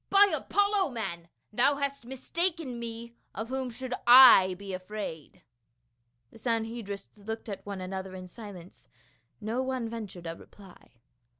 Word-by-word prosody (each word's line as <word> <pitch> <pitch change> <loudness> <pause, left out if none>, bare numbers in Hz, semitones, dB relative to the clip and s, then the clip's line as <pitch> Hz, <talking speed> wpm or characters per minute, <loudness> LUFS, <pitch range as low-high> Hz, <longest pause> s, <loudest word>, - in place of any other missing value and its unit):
" - - -50
By 400 0 +6
Apollo, 405 -3 +1
man, 170 -7 -5 0.2
thou 265 +6 +3
hast 280 -3 -3
mistaken 295 0 -2
me; 235 0 -7 0.2
of 220 +3 -4
whom 260 -1 -2
should 250 +2 -5
I 240 -7 +9
be 195 +1 -7
afraid 185 -4 -7 0.4
?" 120 0 -47
The - - -15
Sanhedrists 225 -3 -3
looked 220 +3 -6
at 200 -2 -6
one 200 -2 -5
another 190 0 -5
in 185 0 -8
silence; 185 -3 -11 0.5
no 225 +4 -2
one 260 -3 -2
ventured 215 -6 -7
a 165 0 -4
reply. 190 -11 -17
225 Hz, 145 wpm, -29 LUFS, 190-255 Hz, 0.5 s, I